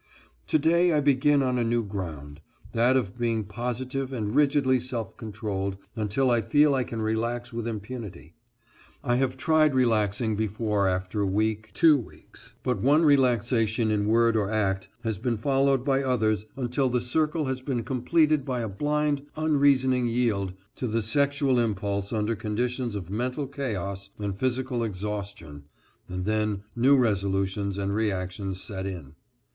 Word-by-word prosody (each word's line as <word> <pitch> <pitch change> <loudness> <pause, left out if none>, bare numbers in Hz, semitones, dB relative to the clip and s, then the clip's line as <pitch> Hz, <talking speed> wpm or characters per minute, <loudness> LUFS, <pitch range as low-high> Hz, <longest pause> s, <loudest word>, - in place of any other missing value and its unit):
To - - +3
day 170 +3 +3
I 150 - +3
begin 140 0 +3
on 125 -1 0
a - - +2
new 115 0 +1
ground, 80 -8 -6 0.3
that 120 +3 +3
of 120 -2 -3
being 115 -2 0
positive 125 +5 -4
and 110 -5 -3
rigidly 140 -3 +3
self 120 -4 -4
controlled 100 -3 -4 0.2
until 115 +4 +1
I 120 -1 +3
feel 145 +6 +4
I 130 -2 +1
can 115 -2 -4
relax 115 +2 -2
with 115 0 -3
impunity. 105 -7 -7 0.7
I 120 -3 +1
have 130 0 0
tried 155 0 +3
relaxing 110 -3 +1
before 105 -1 0
after 95 +3 -1
a 100 - +1
week, 110 +2 -1
two 160 -2 +6
weeks, 110 - -14
but 125 - -1
one 150 +5 +4
relaxation 120 -5 +2
in 105 -1 0
word 115 +1 +3
or 105 -2 +1
act 100 -3 0 0.2
has 110 -4 -2
been 120 0 -1
followed 135 +2 +2
by 135 -1 +2
others 110 -6 0
until 130 +1 0
the 125 0 +1
circle 150 +5 0
has 130 -1 -3
been 130 -3 -2
completed 150 +4 +2
by 130 -3 -2
a 115 - -2
blind 145 +5 -1
unreasoning 140 -5 +3
yield 115 -6 0 0.2
to 125 - -2
the 115 0 -1
sexual 140 +1 +2
impulse 100 -3 -1
under 110 0 0
conditions 120 +2 -2
of 95 -3 -6
mental 125 +6 -2
chaos 100 -8 -4
and 100 -2 -3
physical 130 -1 0
exhaustion, 100 -8 -5 0.4
and 90 0 -4
then 105 -1 0
new 135 +4 +5
resolutions 100 -3 0
and 100 0 -1
reaction 95 -2 -2
set 95 0 -4
in. 85 -8 -7
115 Hz, 155 wpm, -26 LUFS, 105-130 Hz, 0.7 s, two